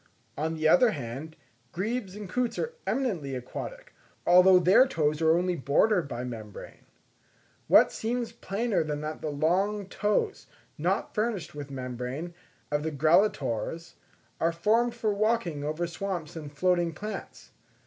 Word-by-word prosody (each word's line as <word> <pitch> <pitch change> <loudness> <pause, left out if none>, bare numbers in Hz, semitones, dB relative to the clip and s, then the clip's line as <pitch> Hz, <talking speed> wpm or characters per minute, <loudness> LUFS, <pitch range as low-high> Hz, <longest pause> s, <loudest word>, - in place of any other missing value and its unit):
On 160 +2 -2
the 155 0 +1
other 250 +8 +6
hand, 140 +3 -6 0.4
grebes 200 +1 -3
and 210 -1 -7
coots 245 +4 -1
are 470 - -2
eminently 180 - -1
aquatic, - - -7 0.3
although 180 +1 +7
their 185 +9 +6
toes 155 - 0
are 160 +1 +4
only 180 0 0
bordered 165 +5 +2
by 120 -2 -5
membrane. 110 -5 -9 0.8
What - - +6
seems 235 +1 -2
plainer 225 -2 -1
than 150 -1 -3
that 155 +1 -5
the 155 - -2
long 185 +8 +1
toes, 210 - -1 0.3
not - - -1
furnished 215 -5 -2
with 145 -1 -7
membrane, 130 +5 -5 0.4
of 150 0 +1
the 160 +1 -2
Grallatores, 155 - +1 0.5
are 165 - +2
formed 225 +8 +2
for 220 -3 0
walking 200 -8 0
over 155 +3 -2
swamps 170 -2 -4
and 150 -3 -7
floating 175 +2 +1
plants. 210 +4 -7
170 Hz, 140 wpm, -28 LUFS, 150-210 Hz, 0.8 s, although